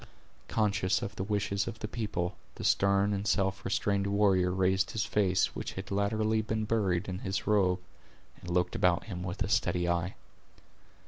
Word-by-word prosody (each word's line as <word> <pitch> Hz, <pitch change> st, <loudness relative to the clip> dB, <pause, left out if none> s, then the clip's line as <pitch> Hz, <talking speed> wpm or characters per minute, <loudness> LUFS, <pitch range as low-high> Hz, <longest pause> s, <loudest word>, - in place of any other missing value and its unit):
Conscious 100 Hz, -3 st, +1 dB
of 100 Hz, -, -5 dB
the 95 Hz, -, -3 dB
wishes 100 Hz, -1 st, -1 dB
of 110 Hz, -, -5 dB
the 105 Hz, -, -5 dB
people, 105 Hz, -6 st, -3 dB, 0.2 s
the -, -, -7 dB
stern 100 Hz, +1 st, +3 dB
and 100 Hz, +1 st, -2 dB
self 95 Hz, 0 st, +1 dB
restrained 100 Hz, 0 st, 0 dB
warrior 100 Hz, -3 st, +3 dB
raised 95 Hz, +1 st, +2 dB
his 110 Hz, -4 st, -1 dB
face, 95 Hz, -3 st, +1 dB
which -, -, -4 dB
had 95 Hz, +1 st, -7 dB
latterly 110 Hz, +2 st, +1 dB
been 110 Hz, 0 st, -2 dB
buried 100 Hz, -5 st, 0 dB
in 95 Hz, -1 st, -4 dB
his 95 Hz, -2 st, -3 dB
robe, 95 Hz, -4 st, +3 dB, 0.6 s
and 90 Hz, -, -9 dB
looked 90 Hz, 0 st, +1 dB
about 90 Hz, -1 st, +2 dB
him 90 Hz, -5 st, -6 dB
with 90 Hz, +4 st, -2 dB
a -, -, -3 dB
steady 90 Hz, -3 st, +1 dB
eye. 85 Hz, +2 st, -1 dB
100 Hz, 175 wpm, -30 LUFS, 90-105 Hz, 0.6 s, stern